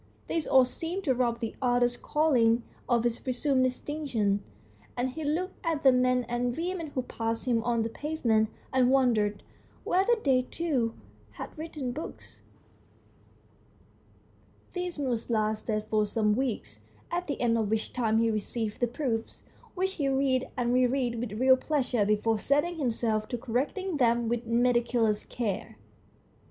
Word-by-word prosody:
This 325 Hz, -2 st, -1 dB
all 260 Hz, -1 st, +6 dB
seemed 335 Hz, +9 st, -4 dB
to 275 Hz, -7 st, +2 dB
rob 240 Hz, -1 st, 0 dB
the 225 Hz, -, -3 dB
author's 245 Hz, -1 st, +2 dB
calling 245 Hz, -6 st, +2 dB, 0.3 s
of 240 Hz, -1 st, +2 dB
its 240 Hz, -1 st, 0 dB
presumed 260 Hz, +1 st, +1 dB
distinction, 250 Hz, -6 st, -1 dB, 0.5 s
and 250 Hz, +1 st, 0 dB
he 315 Hz, +4 st, -6 dB
looked 345 Hz, +6 st, -2 dB
at 325 Hz, -4 st, -1 dB
the 265 Hz, -, +8 dB
men 250 Hz, 0 st, +3 dB
and 240 Hz, +1 st, -1 dB
women 345 Hz, 0 st, -2 dB
who 255 Hz, -, 0 dB
passed 225 Hz, -1 st, -3 dB
him 235 Hz, -3 st, +2 dB
on 235 Hz, -2 st, +1 dB
the 225 Hz, -, -2 dB
pavement, 230 Hz, -6 st, 0 dB, 0.2 s
and 255 Hz, -1 st, +4 dB
wondered 225 Hz, -6 st, +2 dB, 0.4 s
whether 390 Hz, +6 st, +3 dB
they 260 Hz, -2 st, +4 dB
too 255 Hz, -5 st, -1 dB, 0.4 s
had -, -, -8 dB
written 305 Hz, -5 st, -5 dB
books. 305 Hz, +6 st, -8 dB, 2.3 s
This 360 Hz, -2 st, -3 dB
mood 250 Hz, -5 st, -1 dB
lasted 215 Hz, -1 st, 0 dB
for 215 Hz, -1 st, +1 dB
some 210 Hz, 0 st, +1 dB
weeks, 215 Hz, -, -3 dB, 0.3 s
at 355 Hz, +1 st, -2 dB
the 285 Hz, -, -3 dB
end 235 Hz, -2 st, +2 dB
of 220 Hz, -3 st, 0 dB
which 220 Hz, 0 st, -1 dB
time 225 Hz, -3 st, +1 dB
he 225 Hz, 0 st, +3 dB
received 215 Hz, 0 st, -3 dB
the 245 Hz, -, +2 dB
proofs, 235 Hz, -2 st, -3 dB, 0.3 s
which 380 Hz, +1 st, 0 dB
he 285 Hz, -7 st, -1 dB
read 265 Hz, -1 st, +1 dB
and 245 Hz, -1 st, +1 dB
re 250 Hz, 0 st, +4 dB
read 245 Hz, -2 st, -1 dB
with 230 Hz, -3 st, -4 dB
real 260 Hz, 0 st, +6 dB
pleasure 255 Hz, -7 st, 0 dB
before 215 Hz, +1 st, +2 dB
setting 295 Hz, -, +1 dB
himself 225 Hz, -5 st, 0 dB
to 245 Hz, -, -3 dB
correcting 290 Hz, -, -2 dB
them 235 Hz, -2 st, +2 dB
with 235 Hz, 0 st, -2 dB
meticulous 235 Hz, -2 st, +2 dB
care. 205 Hz, -, -4 dB
245 Hz, 155 wpm, -29 LUFS, 225-280 Hz, 2.3 s, the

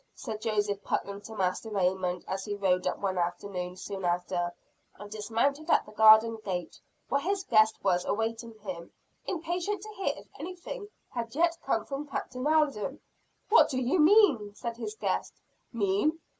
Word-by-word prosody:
said 215 Hz, -1 st, -6 dB
Joseph 205 Hz, -2 st, 0 dB
Putnam 200 Hz, 0 st, -2 dB
to 220 Hz, +1 st, -10 dB
Master 190 Hz, +3 st, -1 dB
Raymond 185 Hz, -3 st, 0 dB
as 190 Hz, 0 st, -3 dB
he 205 Hz, 0 st, -3 dB
rode 185 Hz, -2 st, +1 dB
up -, -, -1 dB
one 190 Hz, -2 st, -1 dB
afternoon 180 Hz, +1 st, -3 dB
soon 195 Hz, 0 st, -6 dB
after, 175 Hz, 0 st, 0 dB, 0.5 s
and 205 Hz, 0 st, -10 dB
dismounted 230 Hz, +8 st, -1 dB
at -, -, +4 dB
the -, -, -13 dB
garden 220 Hz, +1 st, +7 dB
gate, 180 Hz, -3 st, -4 dB, 0.3 s
where 280 Hz, +2 st, +1 dB
his 390 Hz, +4 st, -1 dB
guest 220 Hz, -6 st, +4 dB
was 180 Hz, -2 st, +2 dB
awaiting 225 Hz, +1 st, -2 dB
him, 180 Hz, -4 st, -7 dB, 0.4 s
impatient 355 Hz, +4 st, -2 dB
to 430 Hz, -, -8 dB
hear 390 Hz, -2 st, -1 dB
if -, -, -12 dB
anything 370 Hz, +6 st, -6 dB, 0.2 s
had 235 Hz, -1 st, -4 dB
yet 335 Hz, +1 st, +3 dB
come 225 Hz, -5 st, 0 dB
from 285 Hz, +1 st, -5 dB
Captain 255 Hz, 0 st, -3 dB
Alden. 295 Hz, -4 st, +1 dB, 0.5 s
"What 440 Hz, -, +7 dB
do 255 Hz, -, -1 dB
you 260 Hz, +8 st, +1 dB
mean?" 300 Hz, -, +5 dB
said 235 Hz, 0 st, -4 dB
his 425 Hz, -, -5 dB
guest. -, -, -2 dB, 0.4 s
"Mean? 225 Hz, +9 st, +1 dB
220 Hz, 165 wpm, -29 LUFS, 195-295 Hz, 0.5 s, garden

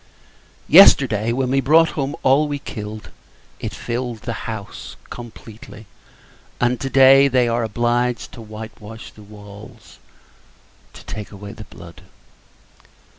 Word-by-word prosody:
Yesterday, 120 Hz, -, +6 dB
when 130 Hz, +1 st, -1 dB
we 135 Hz, 0 st, +2 dB
brought 160 Hz, +5 st, +4 dB
home 140 Hz, -1 st, -3 dB
all 140 Hz, +3 st, +3 dB
we 145 Hz, -1 st, -3 dB
killed, 105 Hz, -5 st, -8 dB, 0.5 s
it -, -, -5 dB
filled 120 Hz, -2 st, -5 dB
the 115 Hz, -, -4 dB, 0.2 s
house, 110 Hz, -2 st, -8 dB, 0.2 s
completely; 110 Hz, -2 st, -11 dB, 0.7 s
and, 125 Hz, 0 st, +1 dB
to 135 Hz, -, -3 dB
day, 135 Hz, +1 st, +6 dB
they 125 Hz, -2 st, +2 dB
are 115 Hz, 0 st, 0 dB
obliged 120 Hz, +2 st, -1 dB
to 115 Hz, -, -11 dB
white 110 Hz, 0 st, -10 dB
wash 110 Hz, +2 st, -10 dB
the 105 Hz, -, -17 dB
walls, 105 Hz, 0 st, -14 dB, 0.9 s
to -, -, -13 dB
take 105 Hz, -1 st, -7 dB
away 100 Hz, 0 st, -10 dB
the 110 Hz, -2 st, -11 dB
blood. 85 Hz, 0 st, -14 dB
120 Hz, 130 wpm, -20 LUFS, 110-130 Hz, 0.9 s, Yesterday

